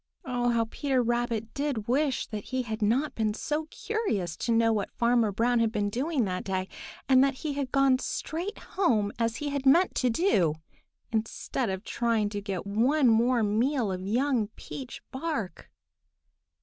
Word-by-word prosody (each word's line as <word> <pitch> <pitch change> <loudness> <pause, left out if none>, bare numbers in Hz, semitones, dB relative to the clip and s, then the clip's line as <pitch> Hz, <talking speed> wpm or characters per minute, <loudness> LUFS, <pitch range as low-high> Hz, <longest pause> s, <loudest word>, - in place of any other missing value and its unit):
Oh, 245 -1 0
how 230 -1 +2
Peter 275 -3 0
Rabbit 235 -2 -1
did 275 -7 -2
wish 270 +1 +1
that 210 -2 -6
he 260 -1 -2
had 220 -2 -5
not 250 +8 +1
been 215 -2 -1
so 305 +5 -2
curious 215 - -2
to 235 - -2
know 225 0 +4
what 205 -2 -1
Farmer 235 -2 +3
Brown 235 +4 +2
had 225 -1 +2
been 205 -2 -1
doing 265 +1 0
that 185 -1 -3
day, 190 -1 -2 0.4
and 260 -1 +6
that 275 -1 +1
he 295 +2 -4
had 280 -2 -3
gone 275 -2 +4
straight 405 - -4
home 220 - 0
as 230 0 +1
he 295 +3 -3
had 280 -1 -2
meant 345 +7 +5
to 255 - +2
do, 210 - +2 0.6
instead 225 +2 -2
of 190 +1 -3
trying 230 -4 0
to 205 -1 -4
get 195 -3 -4
one 245 +7 +3
more 235 +1 +3
meal 225 +2 +1
of 185 0 -3
young 235 +3 +1
peach 260 -3 -8
bark! 260 - -4
235 Hz, 175 wpm, -28 LUFS, 215-275 Hz, 0.6 s, and